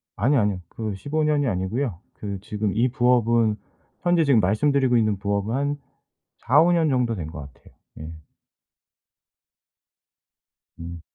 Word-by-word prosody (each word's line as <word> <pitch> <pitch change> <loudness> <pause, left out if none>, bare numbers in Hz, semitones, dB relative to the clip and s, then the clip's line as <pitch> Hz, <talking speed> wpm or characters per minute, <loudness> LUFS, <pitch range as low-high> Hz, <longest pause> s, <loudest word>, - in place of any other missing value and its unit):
아니 135 +7 +2
아니요. 105 -4 +1
그 110 -3 -5
15 150 +9 -2
년이 145 -2 +1
아니고요. 95 +2 -2
그 100 -2 -6
지금 105 -1 -3
이 120 +4 +3
부업은 120 -3 +2 0.5
현재 175 -2 +3
지금 140 -6 +4
말씀드리고 125 +6 +2
있는 110 -3 +1
부업은 100 +3 -2
한 145 +1 -1 0.6
4-5 150 +8 +4
년 165 -3 +2
정도 125 -4 +1
된 85 -6 -5
것 80 - -9
같아요. - - -22 0.3
예. 80 +1 -7 2.7
음. 85 0 -8
115 Hz, 235 characters per minute, -23 LUFS, 100-140 Hz, 2.7 s, 지금